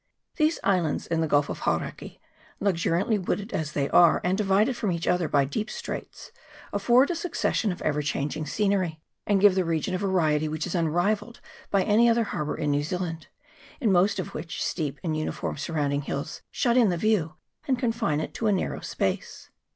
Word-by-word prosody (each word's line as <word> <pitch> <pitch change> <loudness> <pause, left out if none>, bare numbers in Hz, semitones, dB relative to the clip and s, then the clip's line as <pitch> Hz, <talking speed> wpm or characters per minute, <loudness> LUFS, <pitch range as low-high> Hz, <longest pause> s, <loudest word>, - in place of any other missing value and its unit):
These 310 +1 +2
islands 180 -6 +1
in 165 -1 -1
the 160 - +1
Gulf 145 -1 +3
of - - -5
Hauraki, - - -3 0.4
luxuriantly 190 +2 +1
wooded 200 +4 -3
as 155 -1 -2
they 140 -1 0
are, 170 -2 +6
and 180 +1 +1
divided 210 +5 +2
from 210 -5 -1
each 170 -1 -2
other 180 -2 +1
by 140 -2 +3
deep 210 +11 -3
straits, - - -7 0.4
afford 240 - +4
a - - -1
succession 335 - -1
of 180 - -7
ever 150 -1 +1
changing 150 +1 -2
scenery, 190 -3 0 0.3
and 205 -2 +3
give 200 0 +6
the 185 0 +1
region 165 +2 -1
a 185 - -1
variety 160 -6 +1
which 155 0 -3
is 180 - -4
unrivalled 195 +7 0 0.3
by 195 -2 +2
any 225 +4 +4
other 230 0 +3
harbour 150 -8 -3
in 150 -1 0
New 145 0 +2
Zealand, 165 0 -4 0.5
in 230 -8 +2
most 190 +3 +3
of 195 - -4
which 165 -3 -4
steep 150 -5 -3
and 160 -3 -1
uniform 155 0 -3
surrounding 145 -2 -1
hills 140 0 -5
shut 240 -1 +1
in 235 -5 +5
the 175 - 0
view, 170 -6 +1 0.3
and 260 -2 +2
confine 230 - 0
it 155 - -4
to 225 - -1
a - - +4
narrow 190 - -1
space. - - -3
180 Hz, 190 wpm, -26 LUFS, 155-210 Hz, 0.5 s, are